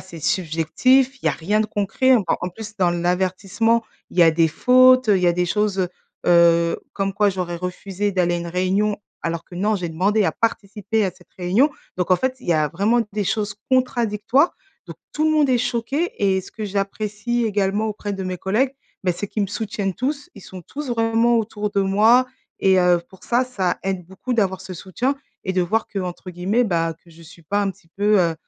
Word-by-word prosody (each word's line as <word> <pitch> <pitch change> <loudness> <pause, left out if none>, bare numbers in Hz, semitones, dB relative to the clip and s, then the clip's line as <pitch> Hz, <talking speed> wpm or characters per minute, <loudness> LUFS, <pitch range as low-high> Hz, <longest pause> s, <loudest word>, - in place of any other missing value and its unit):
c'est 170 -3 -11
subjectif, 185 - +2
il - - -3
y - - +6
a - - +3
rien 205 +6 0
de 215 - 0
concret. 215 +6 +2
En 205 - 0 0.2
en 180 - -2
plus 215 +3 -10
dans 180 -3 +2
l'avertissement, 190 +6 0 0.3
il - - -9
y - - +8
a 165 - +7
des 165 0 +3
fautes, 255 +7 +5
heu, 200 - +5
il 180 - -1
y - - +3
a - - +3
des 180 +1 0
choses, 210 0 0
heu 180 -2 +1 0.4
heu, 170 -1 +4
comme 195 -1 -1
quoi 205 +1 +2
j'aurais 180 -2 -3
refusé 190 +3 -3
d'aller 175 -2 +1
à - - -1
une 170 - -5
réunion. 190 +4 0 0.3
Alors 165 0 -3
que 175 - -14
non, 210 +4 +1
j'ai 175 -2 -4
demandé 200 +6 +1
à 160 - +1
participer 215 -1 -1
à 190 - 0
cette 180 0 -22
réunion. 200 +12 +3 0.3
Donc 180 0 -2
en 185 - +6
fait, 260 +3 -1
il - - -13
y - - +5
a 155 -1 +2
vraiment 205 +9 +1
des 205 -1 -1
choses 205 0 -1 0.2
contradictoires. 245 - +2 0.3
Donc - - -9 0.2
tout 310 - 0
le 315 - +3
monde 300 -3 +3
est 250 - +4
choqué 255 +8 -1
et 190 -1 +3
ce - - -13
que 215 - -6
j'apprécie 210 +4 -2
également 205 +1 0
auprès 205 -1 -4
de 190 - -5
mes 185 0 -3
collègues, 245 +8 0 0.3
bah, 180 -1 +1
c'est 205 - -4
qu'ils 210 - -2
me - - 0
soutiennent 205 -2 -3
tous, 285 +6 -3
ils - - -12
sont 185 -1 -10
tous 285 - -6
vraiment 230 0 +2
autour 210 -1 -3
de 200 -1 +1
moi 220 +6 +4 0.3
et 190 -1 +4
heu, 180 -1 +4
pour 190 - -16
ça, 245 +2 +2
ça 195 -8 -2
aide 190 -2 -3
beaucoup 195 +7 -5
d'avoir 190 -4 0
ce 190 - -8
soutien 235 - -2 0.3
et 190 - -2
de 185 - +2
voir 220 +6 0
qu'entre 185 -2 -5
guillemets, 195 +8 0
bah, 165 -4 0
que 170 - -20
je 165 +1 -17
suis 165 +1 -15
pas 200 +6 -1
un 195 - 0
petit 180 -3 -18
peu, 205 0 +3
heu 165 -2 +1
200 Hz, 225 wpm, -21 LUFS, 180-225 Hz, 0.4 s, y